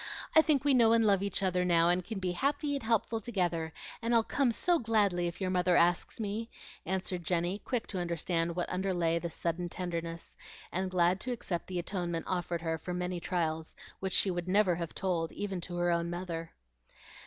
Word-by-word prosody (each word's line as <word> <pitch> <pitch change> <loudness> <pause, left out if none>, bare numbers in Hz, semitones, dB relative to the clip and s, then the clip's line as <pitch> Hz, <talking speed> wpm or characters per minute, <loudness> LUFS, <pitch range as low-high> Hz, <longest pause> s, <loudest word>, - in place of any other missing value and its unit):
I 315 - +10
think 295 -3 +2
we 285 - +5
know 230 -3 +6
and 230 -1 +4
love 200 -2 +4
each 200 -1 -1
other 180 -1 +2
now, 170 -2 +4
and 180 +1 +2
can 220 +3 -5
be 185 -2 -1
happy 285 - 0
and 280 - -2
helpful 225 0 0
together, 175 -7 -1 0.3
and 235 +1 +1
I'll 230 - +5
come 265 +1 +1
so 345 +8 +2
gladly 205 -7 +2
if 170 0 -6
your 185 -1 -1
mother 180 -1 +3
asks 175 +5 +2
me," 220 +2 -3 0.4
answered 185 -1 -2
Jenny, 175 +3 0
quick 240 +2 -2
to 190 - -3
understand 170 0 -1
what 175 - -1
underlay 175 -3 0
this 170 -1 -5
sudden 175 +1 -2
tenderness, 170 -2 -5 0.4
and 190 +1 -1
glad 180 0 +2
to 255 - -2
accept 190 -7 -3
the 185 - -4
atonement 175 -2 -2
offered 175 -2 -2
her 160 -1 -1
for 180 +3 -4
many 180 0 -2
trials 160 -3 -2 0.2
which 190 -1 -2
she 195 - +4
would 175 0 -3
never 195 -1 +4
have 170 -1 -4
told 170 -4 -1
even 195 -3 -3
to 175 +1 -6
her 175 0 +1
own 170 0 0
mother. 170 -2 -4
180 Hz, 200 wpm, -31 LUFS, 170-205 Hz, 0.4 s, I